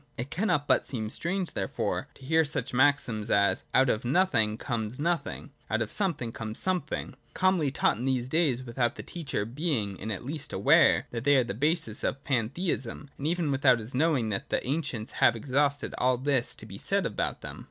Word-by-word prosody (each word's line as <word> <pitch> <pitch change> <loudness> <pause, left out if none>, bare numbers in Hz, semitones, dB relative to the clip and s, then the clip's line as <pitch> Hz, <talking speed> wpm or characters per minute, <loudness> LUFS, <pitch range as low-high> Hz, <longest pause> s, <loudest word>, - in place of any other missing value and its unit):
It 125 +4 -5
cannot 165 -7 0
but - - +4
seem 110 -5 -4
strange, 180 +1 -2
therefore, - - -2
to 130 - -14
hear 160 +3 +4
such 145 -4 -4
maxims 125 -5 +2
as, 100 0 +2
' - - -37
Out 135 - +5
of 110 -1 0
nothing 120 - +2
comes 115 -1 -3
nothing: 165 -2 -2 0.2
Out 110 - +1
of 110 - -8
something 165 - -1
comes 110 -1 -5
something,' 180 -5 -2 0.2
calmly 185 -6 +2
taught 135 - +1
in 120 - -4
these 130 -2 0
days, 135 -4 +1
without 120 -1 -1
the - - -7
teacher 150 -11 -3
being 115 - -2
in 110 - -5
the 105 - -2
least 150 +5 -6
aware - - +4
that 115 -1 -4
they 145 +1 +5
are 130 - +4
the 115 - -4
basis 145 - +1
of 135 - -2
Pantheism, 135 - -2
and 140 - -4
even 170 -3 0
without 130 -2 +4
his 115 +2 -8
knowing 135 -5 +2
that 100 -2 -3
the - - -1
ancients 135 -5 -2
have 115 - +6
exhausted 140 +4 0
all 125 0 +3
that 140 +3 0
is - - -4
to - - -9
be - - -9
said - - +1
about - - -2
them. - - -8
130 Hz, 205 wpm, -28 LUFS, 115-150 Hz, 0.2 s, have